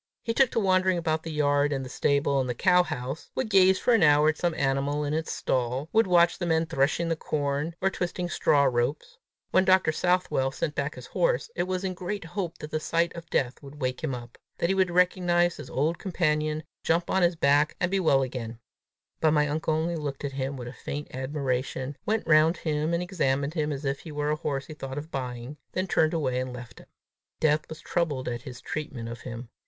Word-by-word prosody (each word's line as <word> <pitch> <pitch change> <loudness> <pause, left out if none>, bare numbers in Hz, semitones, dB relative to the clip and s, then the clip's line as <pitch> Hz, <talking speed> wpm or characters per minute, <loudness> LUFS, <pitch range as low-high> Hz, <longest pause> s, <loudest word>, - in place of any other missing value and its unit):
He 230 - -1
took 265 0 +4
to - - 0
wandering 185 -2 +3
about 160 -2 0
the 165 - -6
yard 145 -1 +2
and 135 -2 -2
the - - -6
stable 140 +1 +1
and 130 -1 -1
the 125 - -1
cow 180 +6 +5
house; 130 -3 -5
would 245 -5 -2
gaze 190 -1 +6
for 245 - +2
an 225 - +4
hour 150 -1 +6
at 155 - -1
some 175 -2 0
animal 140 +1 0
in 145 0 -2
its 160 +1 -2
stall; 130 +4 -1
would 225 -1 +4
watch 175 -1 +4
the 175 - -2
men 160 0 +2
threshing 160 +1 +1
the 165 - +1
corn, 150 +1 -2
or 195 +1 +2
twisting 180 0 -3
straw 145 -4 +3
ropes. 140 - -1 0.3
When 185 - +5
Dr. 185 -3 +4
Southwell 180 -5 +1
sent 150 +2 -3
back 140 +1 -2
his - - -9
horse, - - 0
it - - -1
was 185 0 -2
in 190 -1 -1
great 185 +1 -5
hope 170 -1 -4
that 150 - -8
the 155 - 0
sight 170 +2 0
of 170 -1 -9
Death 125 0 0
would 140 +1 -12
wake 130 0 -2
him 135 -5 -1
up; 120 -1 -10 0.2
that 170 - 0
he - - +3
would 190 -1 +2
recognize 175 -1 +2
his - - -9
old 155 +5 0
companion, 155 -4 0 0.2
jump 170 +1 +1
on 190 - +2
his 175 0 +3
back, 145 0 +3
and 180 0 0
be 195 - +2
well 140 -7 +3
again; 120 -3 -5 0.6
but 155 -1 +3
my 150 -1 +3
uncle 155 +1 0
only 165 +2 -1
looked 145 -3 -4
at 140 - -3
him 135 0 -3
with 120 -1 -7
a 120 - -7
faint 145 +2 -6
admiration, 130 0 -2
went 220 +1 0
round 160 +1 +5
him 155 0 -1
and 170 - -1
examined 145 -6 0
him 155 -3 -1
as 140 0 -4
if 135 0 -1
he 160 - -9
were 150 0 -1
a - - +2
horse 140 -3 -3
he 155 - -9
thought 135 -2 -7
of 155 +3 -6
buying, 125 +1 -5 0.2
then 185 - 0
turned 160 -3 +2
away 130 -6 0
and 130 0 -3
left 120 -1 -10
him. - - -16 0.5
Death 155 0 +2
was 160 - -8
troubled 150 -7 -1
at 120 -1 -3
his 125 -1 -9
treatment 140 -7 -5
of 115 +1 -7
him. 115 -1 -7
155 Hz, 230 wpm, -27 LUFS, 135-175 Hz, 0.6 s, gaze